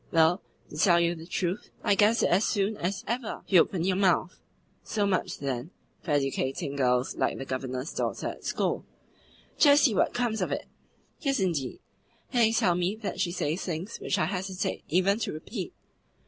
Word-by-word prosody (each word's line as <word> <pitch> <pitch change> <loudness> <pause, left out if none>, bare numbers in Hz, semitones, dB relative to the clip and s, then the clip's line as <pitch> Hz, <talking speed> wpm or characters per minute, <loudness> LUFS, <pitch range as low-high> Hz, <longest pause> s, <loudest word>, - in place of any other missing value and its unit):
"Well, 165 +3 +4 0.3
to 150 - -8
tell 170 +1 +5
you 170 0 +2
the 165 -1 -10
truth, 180 +2 -2
I 205 - +4
guessed 210 +4 +4
it - - +3
as 185 +4 +4
soon 205 0 +1
as 190 +2 -2
ever 235 -1 -3
you 185 -4 +7
opened 175 -1 -1
your 185 -1 +1
mouth." 185 -2 +2 0.5
"So 205 -2 0
much, 195 -2 0
then, 135 +1 -3 0.3
for - - -10
educating 140 -1 0
girls 125 -2 +1
like - - 0
the 135 - -5
Governor's 130 +2 -4
daughter - - -2
at - - -9
school! - - -1 0.8
Just 290 -1 +7
see 250 - +5
what - - +2
comes 240 -3 0
of - - -1
it!" - - -2 0.5
"Yes, 275 -4 0
indeed! 165 -9 -1 0.5
And 245 - +3
they 225 -1 +5
tell 185 -5 +3
me 180 +3 0
that 215 -4 -5
she 175 - +1
says 165 0 -1
things 180 +5 -4
which - - -1
I - - +2
hesitate 190 +2 -3
even 190 +5 +2
to - - -2
repeat." 180 +5 -6
180 Hz, 190 wpm, -28 LUFS, 155-205 Hz, 0.8 s, you